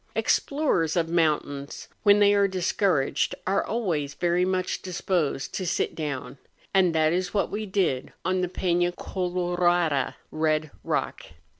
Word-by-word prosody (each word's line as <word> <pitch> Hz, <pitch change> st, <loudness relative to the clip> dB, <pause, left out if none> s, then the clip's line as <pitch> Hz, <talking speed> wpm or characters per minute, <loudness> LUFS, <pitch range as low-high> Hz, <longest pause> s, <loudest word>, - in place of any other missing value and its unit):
Explorers 275 Hz, -, +1 dB
of 165 Hz, -2 st, +1 dB
mountains 150 Hz, -4 st, -1 dB
when 205 Hz, -1 st, +6 dB
they 205 Hz, 0 st, +5 dB
are 200 Hz, -1 st, +4 dB
discouraged 185 Hz, -5 st, 0 dB
are 195 Hz, +1 st, +1 dB
always 170 Hz, -11 st, -2 dB
very 175 Hz, 0 st, +1 dB
much 185 Hz, 0 st, -1 dB
disposed 175 Hz, -6 st, -2 dB
to 190 Hz, -, -2 dB
sit 180 Hz, +1 st, -1 dB
down, 140 Hz, -3 st, -5 dB, 0.3 s
and 185 Hz, -4 st, +3 dB
that 155 Hz, 0 st, +3 dB
is 180 Hz, +2 st, -2 dB
what 200 Hz, -, +1 dB
we 210 Hz, +1 st, -3 dB
did 185 Hz, -10 st, 0 dB
on 185 Hz, 0 st, +1 dB
the 180 Hz, -, -1 dB
Pena 175 Hz, -1 st, +1 dB
Colorada 175 Hz, -5 st, 0 dB, 0.2 s
(Eed 155 Hz, -1 st, 0 dB
Eock). -, -, -2 dB
175 Hz, 140 wpm, -26 LUFS, 155-190 Hz, 0.3 s, when